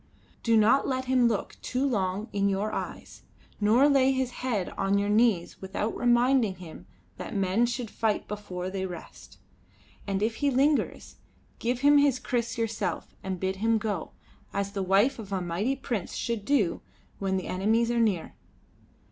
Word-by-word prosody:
"Do 230 -1 +3
not 220 +6 +4
let 260 -1 -1
him 255 -2 +3
look 220 -3 -2
too 255 +2 -1
long 200 -3 -1
in 200 0 +2
your 200 +2 -1
eyes, - - -6 0.4
nor 225 +7 +5
lay 270 -2 +4
his 260 -2 -1
head 235 -7 -2
on 195 +1 0
your 200 0 0
knees 210 -5 +2
without 195 +3 -3
reminding 245 -3 +3
him 160 - -11 0.3
that - - -6
men 195 +4 +2
should 240 -2 -4
fight 220 -2 -1
before 185 -3 -5
they 190 -1 -2
rest. 175 -3 -11 0.7
And 195 0 -1
if 225 +1 -1
he 285 - +1
lingers, 280 +3 0 0.4
give 245 +1 -1
him 290 +1 +6
his 285 -3 +3
kriss 240 -2 -2
yourself 225 -1 -2
and 190 -2 -4
bid 190 +1 -2
him 225 +2 +2
go, 205 -5 -3 0.4
as 200 0 -2
the 200 -1 -3
wife 200 +8 +3
of 205 -3 -8
a 190 - 0
mighty 180 +9 -1
prince 240 -8 -4
should 230 -4 -3
do 235 -12 +1 0.4
when 190 -1 0
the 185 - -4
enemies 225 +5 +1
are 240 - +1
near. 205 -8 0
215 Hz, 170 wpm, -27 LUFS, 195-245 Hz, 0.7 s, him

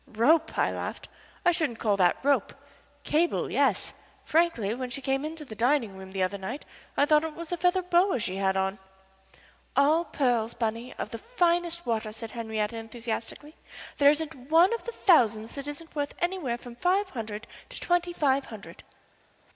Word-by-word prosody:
"Rope?" 300 +9 +2
I - - +2
laughed. - - -5 0.4
"I 350 - +6
shouldn't 315 -9 -1
call 210 -3 +1
that 180 -2 +4
rope. 280 0 +2 0.5
Cable, 335 +3 +1
yes - - +2 0.3
frankly, 315 -11 +2
when 250 +1 -4
she 245 - -4
came 270 +1 -1
into 310 0 -6
the 230 - -9
dining 235 -2 +1
room 190 0 -10
the 190 -1 0
other 195 +2 -1
night 240 +10 -5 0.3
I 285 - +5
thought 300 +1 +4
it 320 -1 -4
was 335 0 -7
a - - +1
feather 360 +2 +2
boa 360 -1 +3
she 190 -5 -3
had 190 -1 +1
on." 190 +1 -1 1.0
"All 305 +4 +4
pearls, 240 -7 0
Bunny, 230 +1 -2
of - - -5
the 230 - -5
finest 345 - 0
water," 220 -2 -1
said 225 0 -6
Henriette, 220 -2 -2
enthusiastically. 230 +5 -5 0.5
"There 285 0 +8
isn't 295 -3 -2
one 340 +7 +6
of 465 - -4
the 470 - -3
thousands 225 - +3
that 280 0 -6
isn't 320 +3 -8
worth 290 -1 -2
anywhere 345 -9 -1
from 240 0 -11
five 375 +8 +1
hundred 220 -3 -5 0.2
to - - -6
twenty 350 0 +1
five 280 -5 +1
hundred." 215 -3 -11
270 Hz, 180 wpm, -28 LUFS, 225-330 Hz, 1.0 s, There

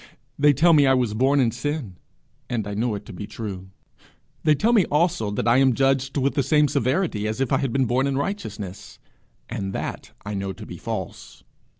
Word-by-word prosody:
They 145 +1 +6
tell 165 +5 +4
me 145 -3 +5
I 135 - +5
was 120 -4 0
born 135 +5 +2
in 120 -4 +3
sin, 125 - -4 0.5
and 115 -5 -2
I 105 - -5
know 110 +1 -1
it 100 - -8
to 115 - -10
be 100 +3 -7
true; 100 -4 -7 0.7
they 155 -1 +4
tell 225 +10 +2
me 215 -5 +5
also 155 - +1
that 105 +2 -2
I 120 +1 +5
am 130 -2 +4
judged 135 +1 +1
with 140 0 +1
the 140 - +1
same 150 +3 +3
severity 135 - 0
as 110 +3 -3
if 135 -3 -1
I - - +3
had 135 - -1
been 135 +1 +2
born 125 +3 +1
in 135 -1 -1
righteousness, 140 - -5 0.5
and 100 -4 -4
that - - -5 0.2
I 100 - -4
know 95 -1 -3
to - - -10
be - - -9
false. - - -6
130 Hz, 215 wpm, -23 LUFS, 110-145 Hz, 0.7 s, They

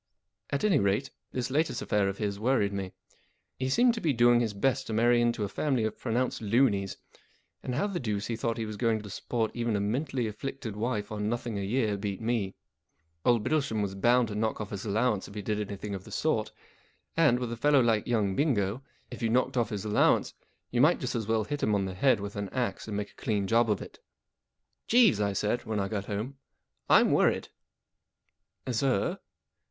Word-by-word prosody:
At 140 - -2
any 195 -9 +4
rate, 100 +7 0 0.2
this 125 0 -3
latest 155 +4 +1
affair 105 -1 +1
of 100 - -5
his 100 -2 -2
worried 110 -4 +1
me. 95 -2 -4 0.7
He 130 0 -1
seemed 240 - +4
to 225 - -5
be 155 -4 +2
doing 120 0 +5
his 110 -4 -1
best 130 +5 0
to 110 - -3
marry 120 +2 +4
into 120 -2 +1
a - - -1
family 130 +3 0
of 110 -1 -3
pronounced 125 +1 -1
loonies, 105 -3 +2 0.6
and 125 - -3
how 145 - +1
the 195 -4 -2
deuce 105 -5 -2
he 115 - -2
thought 115 0 -2
he 115 - -2
was 105 -1 -6
going 115 -2 +1
to 105 - -9
support 115 +2 -2
even 115 -2 -1
a - - +1
mentally 125 +5 -1
afflicted 110 +1 -5
wife 105 -1 -2
on 105 0 -2
nothing 120 -2 -3
a - - -2
year 105 0 0
beat 100 -1 -4
me. 110 -4 -1 0.7
Old 120 -3 +3
Bittlesham 135 -8 0
was 95 -1 -3
bound 120 +4 +3
to - - -5
knock 110 +1 -1
off 105 -2 -5
his 100 +1 -5
allowance 105 0 +1
if 100 - -12
he 105 - -4
did 105 +1 -1
anything 100 0 -5
of 95 -1 -5
the 110 - -13
sort; 110 -1 0 0.6
and, 150 -7 +4
with 125 -2 -3
a - - -2
fellow 145 +4 +4
like 115 -4 +2
young 105 -5 +1
Bingo, 115 -5 +1 0.3
if 120 - -8
you 115 - +1
knocked 125 +3 +1
off 120 -3 +1
his 105 -2 -4
allowance, 105 0 +3 0.4
you 120 - +2
might 155 +5 +5
just 130 -6 -3
as 115 -4 -2
well 110 -1 +2
hit 145 +7 -4
him 105 - +2
on 100 -1 0
the 95 - -4
head 120 +4 +3
with 100 0 -6
an 100 -1 -3
axe 120 -5 -2
and 105 -2 -3
make 105 0 -4
a - - -20
clean 105 -3 0
job 115 +3 +3
of 105 - 0
it. - - -13 0.5
" - - -53
Jeeves," 225 - +5
I 100 -1 +1
said, 105 +4 -1
when 110 -2 -2
I 100 - 0
got 100 -1 -3
home, 110 +7 -4 0.5
"I'm - - +6
worried." - - +2 0.7
" - - -51
Sir 125 -3 0
110 Hz, 220 wpm, -29 LUFS, 105-125 Hz, 0.7 s, I'm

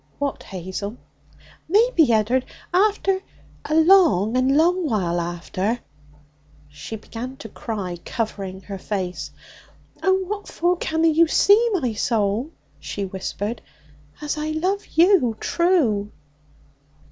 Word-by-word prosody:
'What, 285 -1 -2
Hazel?' 190 +4 -6 0.7
'Maybe, 395 - +4
Ed'ard, 230 +4 +2 0.3
after 390 0 +2 0.4
a 310 - -1
long 320 - +5
and 260 +2 +3
long 345 0 +2
while 175 -6 0
after 175 +6 -2 0.5
' 150 0 -37 0.3
She 150 +9 -8
began 235 +4 -7
to 225 - -9
cry, 200 -6 -5
covering 195 -4 -4
her 195 -1 -7
face. 185 -3 -4 0.7
'Oh, 380 0 +2
what 410 +2 -5
for 350 +2 +1
canna 320 0 +1
you 325 +1 +4
see, 420 +8 +5
my 255 - 0
soul,' 220 +3 0 0.3
she 200 - -4
whispered, 195 +4 -4 0.6
'as 300 0 -3
I 305 - -2
love 375 +6 -1
you 325 - +3
true?' 280 - +1
250 Hz, 120 wpm, -22 LUFS, -, 0.7 s, long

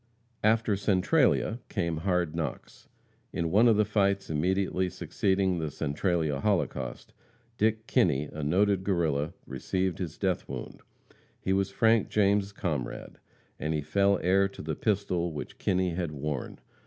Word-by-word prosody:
After 110 0 +3
Centralia 105 - +2
came 85 -5 -1
hard 90 -2 0
knocks. 80 -6 -5 0.4
In 85 -1 -2
one 110 +6 +5
of 115 - +5
the 105 - +4
fights 100 -3 +1
immediately 95 +3 0
succeeding 95 0 0
the 80 -2 -2
Centralia 75 0 -1
holocaust, 100 +2 -2 0.5
Dick 110 +1 +1
Kinney, 75 -9 +2
a 75 - -5
noted 95 +5 +2
Guerrilla, 80 -6 0
received 90 +7 -2
his 85 -5 -4
death 95 -3 -1
wound. - - -7 0.6
He 95 - 0
was 95 0 +1
Frank 110 +1 +3
James' 100 -1 +2
comrade, 80 - -4 0.4
and 80 +1 -1
he 75 - 0
fell 100 +6 +2
heir 95 +2 +4
to 100 - -10
the 80 +1 -2
pistol 90 -2 0
which 75 - -7
Kinney 90 -1 +1
had 85 -2 -2
worn. 75 -2 -4
95 Hz, 140 wpm, -28 LUFS, 80-100 Hz, 0.6 s, one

